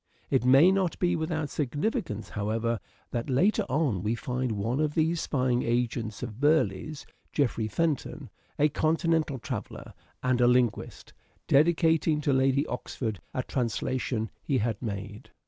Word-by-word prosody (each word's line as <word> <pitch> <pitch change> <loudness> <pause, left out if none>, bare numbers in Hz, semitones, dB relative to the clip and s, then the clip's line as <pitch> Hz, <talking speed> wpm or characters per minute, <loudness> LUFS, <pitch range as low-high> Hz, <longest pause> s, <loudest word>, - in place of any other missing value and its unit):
It - - +3
may 135 +8 +7
not 190 -3 0
be 175 -1 +1
without 160 -2 -2
significance, 145 - -2
however, 110 +2 -1 0.3
that 120 +1 -3
later 195 - +2
on 140 - +1
we 110 +4 0
find 125 0 -2
one 110 +6 -1
of 150 -1 0
those 165 +1 +1
spying 125 -3 +1
agents 115 -2 -1
of 115 -2 -6
Burleigh's, 145 -2 +1 0.3
Geoffrey 120 -6 0
Pent 160 +5 0
on, - - -10 0.3
a 150 - +4
continental 160 -1 +1
traveller - - -6 0.3
and 125 -1 +2
a 120 - +6
linguist, 125 -2 0 0.3
dedicating 160 +1 +3
to 145 -1 +1
Lady 135 +2 +3
Oxford 115 - -4 0.2
a 130 - 0
translation 120 -2 -2
he 135 - 0
had 115 -2 -1
made. 105 +1 -6
130 Hz, 145 wpm, -28 LUFS, 115-155 Hz, 0.3 s, may